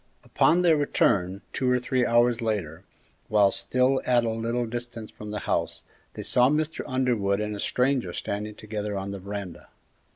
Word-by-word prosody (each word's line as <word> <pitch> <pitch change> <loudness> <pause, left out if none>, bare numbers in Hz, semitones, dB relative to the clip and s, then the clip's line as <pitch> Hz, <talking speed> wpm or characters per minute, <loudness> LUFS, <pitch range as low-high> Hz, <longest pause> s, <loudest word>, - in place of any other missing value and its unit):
Upon 180 +2 +3
their 165 -3 +5
return, 100 -9 +1
two 130 - 0
or 125 - +4
three 125 0 0
hours 120 0 +3
later, 95 -7 -2 0.4
while 105 -2 +4
still 130 +5 +1
at 120 -2 +3
a 115 - 0
little 115 +2 -1
distance 120 -1 -6
from 105 - -9
the 105 0 -4
house, - - -1 0.3
they - - -5
saw 125 +1 +4
Mr. 155 +2 -1
Underwood 120 -7 +1
and 105 0 -2
a - - -7
stranger 125 -6 0
standing 105 +4 -4
together 105 -1 -4
on 95 +1 -4
the 100 - -6
veranda. 100 -2 -7
115 Hz, 170 wpm, -26 LUFS, 100-125 Hz, 0.4 s, their